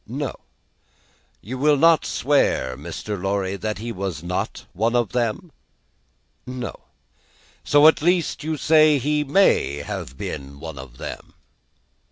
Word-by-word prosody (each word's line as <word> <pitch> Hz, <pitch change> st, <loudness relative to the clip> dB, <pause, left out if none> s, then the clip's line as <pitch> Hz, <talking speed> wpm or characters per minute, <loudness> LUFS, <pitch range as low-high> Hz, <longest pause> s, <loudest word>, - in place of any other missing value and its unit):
"No." -, -, -3 dB, 1.1 s
"You 125 Hz, +6 st, -6 dB
will 150 Hz, +1 st, +4 dB
not 165 Hz, +2 st, +4 dB
swear, 135 Hz, -, +1 dB
Mr. 105 Hz, +8 st, -6 dB
Lorry, 95 Hz, 0 st, -1 dB
that 105 Hz, +3 st, -3 dB
he 115 Hz, +2 st, -5 dB
was 95 Hz, -6 st, -4 dB
not 90 Hz, +1 st, -3 dB
one 115 Hz, +5 st, 0 dB
of 120 Hz, -5 st, +1 dB
them?" 120 Hz, +7 st, -2 dB, 1.0 s
"No." 125 Hz, -1 st, -5 dB, 0.9 s
"So 145 Hz, +1 st, +6 dB
at 160 Hz, -, +5 dB
least 175 Hz, -1 st, +1 dB
you 155 Hz, 0 st, -2 dB
say 155 Hz, -1 st, +5 dB
he 150 Hz, +3 st, 0 dB
may 145 Hz, -, +3 dB
have 65 Hz, -2 st, -6 dB
been 70 Hz, -1 st, -6 dB
one 80 Hz, -3 st, -8 dB
of 65 Hz, -2 st, -11 dB
them?" -, -, -8 dB
120 Hz, 135 wpm, -22 LUFS, 90-150 Hz, 1.1 s, So